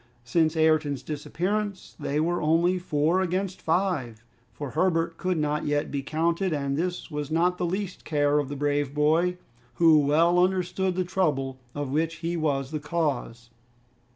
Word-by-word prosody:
Since 160 +6 +1
Ayrton's 155 -4 +2
disappearance 185 +7 -3
they 145 +2 -1
were 175 +3 0
only 170 +4 +2
four 165 +1 +1
against 185 +1 -2
five, 160 - -1 0.3
for 145 +1 -6
Herbert 165 +2 +1
could 185 -2 -1
not 150 -1 -1
yet 145 0 0
be 140 - -2
counted, 165 +5 0
and 140 -2 -1
this 175 +2 -3
was 150 -1 -4
not 175 +3 +1
the 175 - 0
least 190 +1 -4
care 145 -1 +2
of 145 -2 -2
the 145 - -4
brave 145 0 -1
boy, 165 +4 +2 0.4
who 165 -2 +6
well 165 +5 +3
understood 185 0 0
the 185 - +1
trouble 145 -8 -1 0.2
of 145 -2 -3
which 160 +3 0
he 170 +1 -3
was 140 -4 -1
the 155 - -2
cause. 145 -7 -3
160 Hz, 160 wpm, -26 LUFS, 145-180 Hz, 0.4 s, who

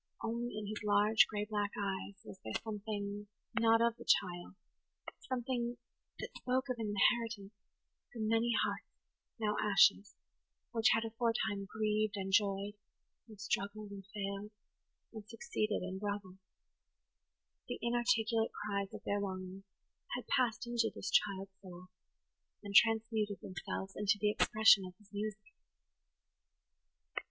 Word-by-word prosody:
Only 235 0 -2
in 215 - -4
his 210 +1 -5
large, 210 +1 +5
gray 210 -1 -2
black 205 -1 -1
eyes 200 0 -3
was 190 - -10
there 110 - -2
something 205 -1 -4 0.3
not 225 0 +5
of 235 0 +2
the - - -10
child–something 235 +6 -2 0.4
that - - -7
spoke 260 +2 0
of 250 - -2
an 220 - -2
inheritance 225 -1 +2 0.6
from 220 -2 -3
many 225 +2 +2
hearts, - - -3 0.5
now 210 -1 +1
ashes, 205 -1 +4 0.6
which 225 0 +4
had 225 +1 0
aforetime 220 -3 -1
grieved 215 -1 0
and 195 0 -3
joyed, 200 0 +2 0.5
and 215 -3 -13
struggled 205 +1 -2
and 200 -1 -8
failed, 200 0 -4 0.6
and 215 -1 -9
succeeded 230 -6 -2
and 185 +1 -4
grovelled. 200 -2 -4 1.3
The - - -3
inarticulate 235 -2 +1
cries 200 -1 -3
of - - -9
their 205 - 0
longings 190 0 -5 0.5
had 245 - -5
passed 245 -4 +1
into 235 -1 +1
this - - -4
child's 195 -1 +1
soul, 185 -1 -11 0.7
and 200 -1 -6
transmuted 220 -2 +4
themselves 190 +1 -5
into 210 0 +2
the 210 0 +3
expression 215 -2 +6
of 185 -1 -8
his 210 -1 -23
music. 215 +6 -5
210 Hz, 130 wpm, -35 LUFS, 200-225 Hz, 1.3 s, expression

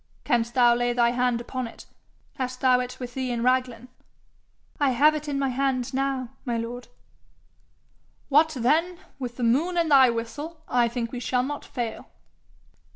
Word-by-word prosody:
'Canst 235 0 0
thou 240 -2 +6
lay 245 0 0
thy 235 -1 +3
hand 245 -1 +1
upon 250 +1 -4
it? 230 - -13 0.5
Hast 255 -1 -4
thou 255 -2 +4
it 250 0 -5
with 245 -1 -6
thee 260 -1 -3
in 235 -1 -2
Raglan?' 250 -1 0 0.9
'I 285 -2 +3
have 285 +5 +4
it 305 0 -5
in 285 -1 -2
my 275 -1 0
hand 260 0 -1
now, 265 -2 -1
my 240 -2 -2
lord.' 240 +2 -5 1.4
'What 305 +3 +4
then 325 +9 +2 0.2
with 245 -2 -5
the 250 - -3
moon 300 +10 +2
and 335 -2 +1
thy 265 -3 +7
whistle, 290 +8 -5
I 240 -1 +2
think 235 -1 -4
we 250 - -5
shall 250 0 0
not 290 +2 -4
fail.' 240 -4 -5
250 Hz, 170 wpm, -25 LUFS, 240-275 Hz, 1.4 s, thy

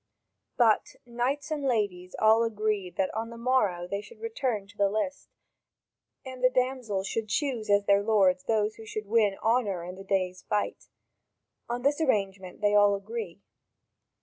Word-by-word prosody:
But 225 -4 +3
knights 255 +5 -2
and 305 -2 -1
ladies 200 -8 -1
all 220 +1 +5
agreed 215 -4 -1
that 190 - 0
on 225 +1 -3
the 235 - -9
morrow 210 -8 +1
they 200 +2 -3
should 210 - -15
return 265 - -2
to 205 +1 -18
the 200 -1 +2
list, 220 +8 -3 1.0
and 260 -1 -8
the 255 - +7
damsels 250 -6 -1
should 220 +2 -2
choose 245 -5 -1
as 200 0 +4
their 200 0 +4
lords 195 -4 +3
those 215 -1 0
who 225 - -10
should 215 -1 -5
win 210 -2 +2
honour 215 -6 +1
in 180 +1 -6
that 195 0 -11
day's 185 -2 0
fight: 210 -1 -2 0.8
on 240 +1 -3
this 290 +3 +2
arrangement 195 - -1
they 205 0 +3
all 205 -1 +5
agree. 200 -2 -6
215 Hz, 165 wpm, -28 LUFS, 200-240 Hz, 1.0 s, the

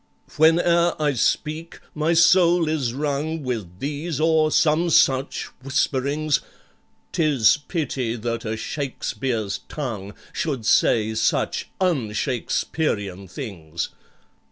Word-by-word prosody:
"Whene'er 170 +2 +4
I 150 -2 +1
speak, 155 +6 -1
my 155 +2 +1
soul 175 -1 +5
is 150 -6 0
wrung 150 +3 -2
With 110 -9 -4
these 145 - -3
or 160 -1 +3
some 160 +2 +3
such 135 -3 +3 0.2
whisperings: 140 +2 0 0.7
''Tis 145 -9 +4
pity 130 -8 -2
that 115 0 -3
a 110 0 -3
SHAKESPEARE'S 120 -6 -3
tongue 110 -9 -5 0.2
Should 135 -9 -2
say 110 0 +3
such 110 0 0
un 150 - 0
Shakesperian 105 - -2
things! 85 - -5
140 Hz, 105 wpm, -23 LUFS, 115-160 Hz, 0.7 s, soul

